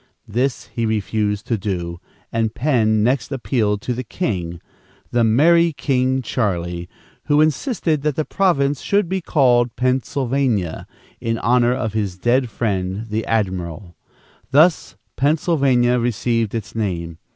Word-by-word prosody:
This 125 +5 -1
he 115 -1 -1
refused 105 -1 -1
to 115 -3 -1
do, 85 -4 -3 0.3
and 115 -1 0
Penn 110 -6 +2
next 130 +5 0
appealed 110 -6 -1
to 125 - -1
the 125 +2 -4
king 90 - -3 0.5
"the 120 -1 +2
merrie 165 +9 +4
King 130 -1 0
Charlie," 85 -7 -2 0.4
who 145 0 +3
insisted 155 - +1
that 150 -1 0
the 155 - -1
province 145 -8 +1
should 200 -2 +1
be 190 +2 -2
called 125 -7 +2
Pennsylvania, 130 - 0 0.3
in 115 0 -1
honor 120 +2 +2
of 110 -4 -3
his 100 -4 -2
dead 120 +5 +1
friend 100 -1 -2
the 110 +1 -2
admiral. 90 -4 -2 0.5
Thus 155 +5 +3 0.2
Pennsylvania 135 -5 +2
received 115 -1 0
its 105 -6 -5
name. 85 -7 -3
120 Hz, 130 wpm, -20 LUFS, 105-135 Hz, 0.5 s, merrie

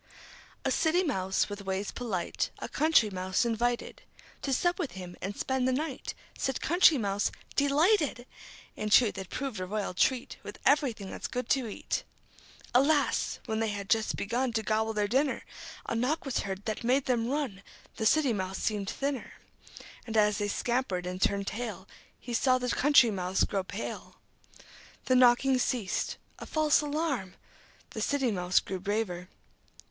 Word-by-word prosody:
A - - +2
City 345 +3 +2
Mouse, 190 - 0
with 205 -1 -6
ways 190 +1 -2
polite, 200 -8 -2
A - - -5
Country 295 -8 +3
Mouse 185 +4 0
invited 235 +1 -1 0.4
To 275 - -2
sup 350 +7 +1
with 320 -7 -3
him 180 -2 -8
and 195 +3 -4
spend 265 -1 0
the - - +3
night. 275 +1 -3 0.2
Said 265 - -1
Country 335 -2 +5
Mouse: 200 -3 0 0.2
"De 285 - +3
lighted!" 300 - +2 0.5
In 215 - -3
truth 210 -2 +5
it 190 - -7
proved 265 -7 -4
a 185 - -4
royal 205 -1 -2
treat, 250 +7 +1
With - - -9
everything 235 -9 +2
that's - - -5
good 250 0 -4
to 265 -4 +2
eat. 210 - -3 0.7
Alas! 280 +3 +3
When 220 0 -2
they 225 - +1
had 200 -2 -4
just 220 -1 +2
begun 240 +4 -1
To 220 -1 0
gobble 220 +1 0
their 210 -1 0
dinner, 265 +5 +1 0.4
A - - -3
knock 255 +8 0
was 270 - -1
heard 195 0 -5
that 215 +1 -3
made 255 +3 +2
them 235 -3 +1
run. 265 -9 -2 0.4
The 220 - +2
City 280 -2 +3
Mouse 190 -2 -3
seemed 205 -2 -1
thinner. 275 -2 -3 0.7
And 225 -1 -2
as 210 -1 +3
they 205 - 0
scampered 220 -4 -1
and 180 +1 -5
turned 200 +1 +1
tail, 210 -4 -5 0.3
He 245 - -7
saw 255 +2 +3
the 250 0 -2
Country 270 -5 +5
Mouse 185 -1 0
grow 195 -2 -1
pale. 200 +4 -6 0.9
The 255 - +2
knocking 255 +1 +5
ceased. 240 -6 -1 0.2
A - - -8
false 310 -2 +3
alarm! 290 - -2 0.6
The - - -5
City 270 -4 +1
Mouse 180 -2 +2
grew 190 -1 -5
braver. 190 -3 -2
230 Hz, 170 wpm, -29 LUFS, 200-270 Hz, 0.9 s, Country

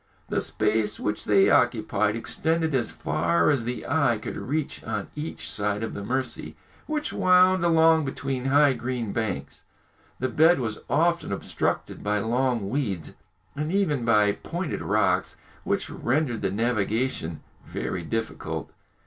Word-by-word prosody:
The - - 0
space 105 0 0
which 105 - -2
they 100 -2 +5
occupied 105 +1 +2
extended 160 +6 0
as 120 -4 +1
far 85 +2 +1
as 125 -5 0
the 125 +1 -4
eye 140 -5 +2
could - - -6
reach 150 +2 -3
on 105 -3 -4
each 150 +2 -5
side 105 +1 -1
of 110 - -4
the 100 - -5
Mercy, 130 +4 -3 0.3
which 305 -1 -2
wound 185 0 +5
along 165 -1 +5
between 135 -1 -3
high 140 +1 +5
green 120 -3 -3
banks. 110 -11 -3 0.5
The 130 - -1
bed 160 +4 +4
was 110 -4 -3
often 170 -3 +1
obstructed 100 - -2
by 105 0 +1
long 120 0 0
weeds, 100 - -2 0.4
and 150 +2 -2
even 170 -10 +1
by 105 -3 +4
pointed 170 - -4
rocks, - - +1 0.3
which - - 0
rendered 125 -3 0
the 100 - 0
navigation 110 - -1 0.3
very 90 - -3
difficult. 110 +7 -4
120 Hz, 140 wpm, -26 LUFS, 105-150 Hz, 0.5 s, they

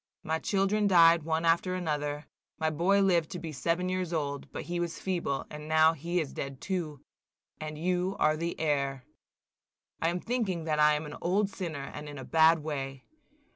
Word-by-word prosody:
My 160 +1 -1
children 200 +2 +1
died 170 -3 +6
one 160 +1 -1
after 170 +2 +2
another; 150 -4 -2 0.3
my 160 0 0
boy 190 +6 +3
lived 175 -4 +2
to 180 - -4
be 165 -1 -6
seven 165 +6 -1
years 185 -2 -2
old, 145 -4 -3
but - - -5
he 175 0 -3
was 170 -1 -2
feeble, 175 -7 -2
and 150 0 -8
now 160 +1 +5
he 170 +3 -2
is 155 -4 -3
dead 135 -1 -5
too, 165 -7 -3 0.6
and 155 0 -6
you 180 +3 0
are 155 0 +3
the 170 +2 -3
heir. 140 -4 0 1.0
I 165 - +2
am 175 +1 -2
thinking 210 -7 -1
that 155 -1 -1
I 150 0 +6
am 150 +1 -3
an 150 - -8
old 195 +3 +1
sinner, 160 -8 -5
and 150 0 -7
in 145 - -8
a 130 - -7
bad 160 -1 +4
way. 135 -3 -4
160 Hz, 190 wpm, -29 LUFS, 150-180 Hz, 1.0 s, died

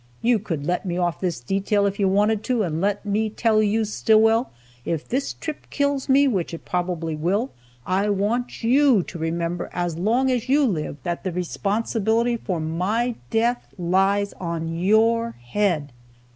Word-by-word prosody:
You 235 -1 +3
could 165 -8 -4
let 180 +3 0
me 175 -3 -3
off 175 -3 -1
this 175 -7 -1
detail, 200 - +1
if 200 0 -1
you 195 - +3
wanted 205 +2 +2
to, 245 -4 +1
and 165 -3 -2
let 205 +1 0
me 215 +2 0
tell 220 0 +2
you, 215 +1 +1
Stillwell, 225 +3 +3 0.3
if 160 +1 -3
this 270 +3 -1
trip 310 -2 -7
kills 280 -1 -1
me, 280 +1 +5
which 185 -9 -1
it - - -12
probably 175 -3 -2
will, 195 - 0 0.3
I 195 +3 +1
want 215 +6 -1
you 255 -3 +4
to 170 - -9
remember, 170 +2 -2
as 175 -2 -2
long 240 +7 +2
as 250 0 -1
you 285 +1 +4
live, 155 - -2
that 175 0 -3
the 185 - -2
responsibility 220 +6 0
for 185 -7 -3
my 190 +10 -1 0.2
death 235 +2 0
lies 195 +3 +1
on 165 -2 -3
your 225 +6 +2
head!" 150 +3 -1
200 Hz, 170 wpm, -23 LUFS, 175-230 Hz, 0.3 s, me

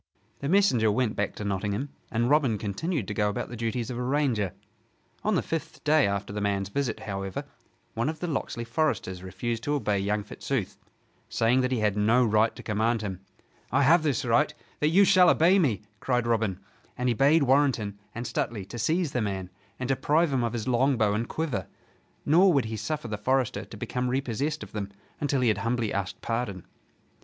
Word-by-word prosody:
The 140 - -3
messenger 135 - +4
went 110 0 0
back 105 - -2
to - - -6
Nottingham; 100 +6 -2 0.2
and 115 +1 +1
Robin 135 -6 +3
continued 110 - -2
to 105 - -3
go 105 0 +1
about 105 - -3
the 120 - -6
duties 115 +2 -2
of 120 - -4
a - - -2
ranger. 125 -8 0 0.7
On 215 -1 +2
the - - +1
fifth 165 -1 -5
day 150 -3 +4
after 100 0 -3
the 105 - -3
man's 100 -1 0
visit, 125 +1 -2
however, 95 -2 -4 0.5
one 115 +6 0
of 155 -1 -5
the 180 - -3
Locksley 135 -7 -3
foresters 115 - -1
refused 95 +6 -4
to 145 - +1
obey 105 -8 0
young 105 +1 0
Fitzooth, 110 0 -3 0.5
saying 120 +3 +2
that 130 0 0
he 125 -4 0
had 105 -2 +2
no 115 +4 +4
right 110 +1 +2
to - - -10
command 110 +1 0
him. 95 -3 -4 0.5
"I 140 +3 +3
have 165 +5 +6
this 145 -4 0
right, 135 +6 +3 0.3
that 150 - +2
you 195 +5 +6
shall 180 -1 +6
obey 180 +5 +5
me!" 120 - +1 0.2
cried 125 0 0
Robin, 110 -5 0 0.4
and 125 - -1
he 120 - +3
bade 140 +6 +4
Warrenton 130 -7 +2 0.2
and 120 +2 -4
Stuteley 110 -4 -2
to 120 - -6
seize 160 +5 +1
the 125 - -1
man 95 -3 -3 0.3
and 125 - -2
deprive 145 +4 +2
him 125 -2 +1
of 115 -1 -1
his 115 -1 -3
longbow 125 -4 +2
and 115 +3 -2
quiver. 145 - -2 0.6
Nor 180 +6 +6
would 140 -5 +2
he 110 0 -4
suffer 150 +2 -3
the 105 -1 -4
forester 120 -2 0
to 105 - -11
become 125 +4 -2
repossessed 135 +4 -1
of - - -11
them 100 -2 -4 0.3
until 140 -2 0
he 125 - +3
had 105 -2 +1
humbly 115 0 -1
asked 95 -2 -3
pardon. 115 -6 -3
120 Hz, 200 wpm, -27 LUFS, 105-140 Hz, 0.7 s, have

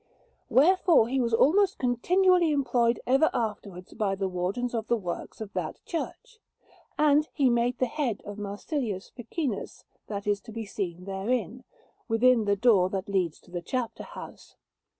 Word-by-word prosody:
Wherefore 335 - +5
he 265 +1 +1
was 235 -1 0
almost 375 - +4
continually 350 +8 +3
employed 245 -5 +1
ever 270 +5 +4
afterwards 205 -5 -4
by 205 -3 -1
the 195 0 -1
Wardens 190 +7 -2
of 225 -2 -3
Works 195 -8 -3
of 205 -2 -7
that 175 -4 -4
church; 450 +7 -6 0.6
and 300 +1 +3
he 270 -5 +3
made 240 +1 +1
the 255 - +2
head 250 -4 -2
of 205 0 -7
Marsilius 205 - -4
Ficinus 240 - -4 0.2
that 200 -1 -5
is 205 -1 0
to 225 - -11
be 225 0 -5
seen 180 -3 -5
therein, 225 +5 -2 0.4
within 230 0 +4
the 205 0 +2
door 195 -4 +4
that 190 0 -4
leads 185 -5 0
to - - -20
the 175 -1 -4
chapter 250 +3 -3
house. - - -11
230 Hz, 155 wpm, -27 LUFS, 200-265 Hz, 0.6 s, Wherefore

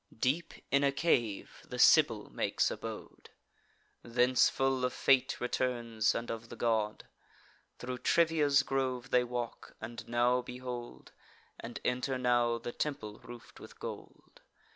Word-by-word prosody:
Deep 145 +8 0 0.2
in 140 +1 +3
a 140 - +3
cave 120 -8 0
the - - -8
Sibyl - - +5
makes - - 0
abode; - - -8 0.7
Thence 125 +2 +3
full 135 -1 0
of 125 - 0
fate 130 -1 +2
returns, 120 -3 0
and 120 - -3
of 115 0 -7
the - - -8
god. 110 -3 -1 0.7
Thro' 125 0 -5
Trivia's 150 -2 +3
grove 130 -2 -2
they 125 - +4
walk; 120 -1 -5
and 115 +1 -8
now 120 +1 +2
behold, 125 -1 -8 0.5
And 120 +1 -7
enter 125 +1 0
now, 120 -2 +2
the 120 - -6
temple 110 -7 -4
roof'd 120 -1 -12
with - - -13
gold. - - -9
125 Hz, 135 wpm, -32 LUFS, 120-130 Hz, 0.7 s, Sibyl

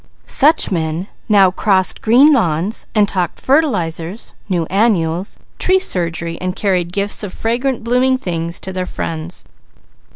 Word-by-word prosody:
Such 305 -2 +3
men 165 +1 -2 0.2
now 195 -3 +5
crossed 190 -3 +2
green 265 +7 +5
lawns 185 - -1
and 210 -1 +4
talked 180 -4 -2
fertilizers, 195 - -1 0.2
new 175 -3 0
annuals, 185 -2 0 0.2
tree 375 +1 +3
surgery, 170 - -2
and 185 0 -3
carried 180 -4 -1
gifts 200 +2 -1
of 205 -3 -4
fragrant, 240 +4 -2
blooming 250 +2 +2
things 170 -6 -3
to 190 - -6
their 185 0 -3
friends. 165 +2 -6
190 Hz, 135 wpm, -16 LUFS, 170-230 Hz, 0.2 s, now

